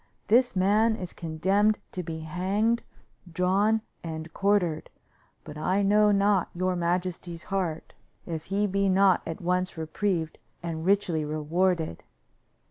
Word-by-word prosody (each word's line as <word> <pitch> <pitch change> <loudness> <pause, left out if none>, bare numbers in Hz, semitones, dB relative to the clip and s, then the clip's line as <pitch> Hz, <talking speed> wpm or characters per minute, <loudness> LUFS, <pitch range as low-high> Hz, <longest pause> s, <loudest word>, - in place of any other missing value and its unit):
This 245 +1 +4
man 210 +4 +3
is 180 -4 -7
condemned 190 +6 +1
to 185 - -4
be 160 -2 -6
hanged, 195 +8 0 0.5
drawn 195 +5 +2 0.2
and 160 -1 -6
quartered, 195 -6 +1 0.5
but 150 - -9
I 190 +5 +1
know 210 +1 +4
not 200 -2 +2
your 185 +1 0
majesty's 175 0 -2
heart 180 -5 -3 0.3
if 160 -2 -5
he 200 +2 0
be 200 0 +1
not 190 -1 +4
at 165 - -5
once 180 0 -1
reprieved 160 +1 -2 0.2
and 165 -2 -4
richly 190 -6 +2
rewarded. 155 - 0
185 Hz, 130 wpm, -27 LUFS, 165-200 Hz, 0.5 s, This